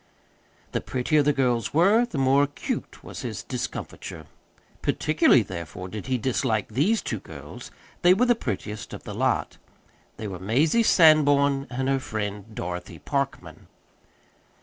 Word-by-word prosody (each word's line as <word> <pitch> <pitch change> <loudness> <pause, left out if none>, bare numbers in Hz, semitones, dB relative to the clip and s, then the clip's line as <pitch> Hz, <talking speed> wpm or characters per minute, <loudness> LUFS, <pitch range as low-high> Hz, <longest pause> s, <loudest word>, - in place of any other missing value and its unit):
The - - -1
prettier 135 +4 +1
the 145 +1 +3
girls 125 -3 0
were, 205 +9 +5
the 165 - -6
more 135 +1 +4
acute 145 0 -4
was - - -8
his - - -5
discomfiture. 80 -2 -6 0.6
Particularly, 150 -6 +3
therefore, 90 0 -7
did 105 +2 -7
he 130 -1 +1
dislike 115 -2 0
these 155 - +1
two - - -3
girls - - -10 0.3
they 180 +1 +6
were 240 +5 +3
the 240 - +5
prettiest 105 - -5
of - - -11
the - - -7
lot. - - 0 0.6
They 110 - -5
were 95 -3 -6
Mazie 140 - +2
Sanborn 145 -7 +5
and 130 +1 -2
her 135 0 +2
friend 105 -5 -4
Dorothy 90 +1 -5
Parkman. 140 -1 -4
135 Hz, 145 wpm, -25 LUFS, 105-150 Hz, 0.6 s, they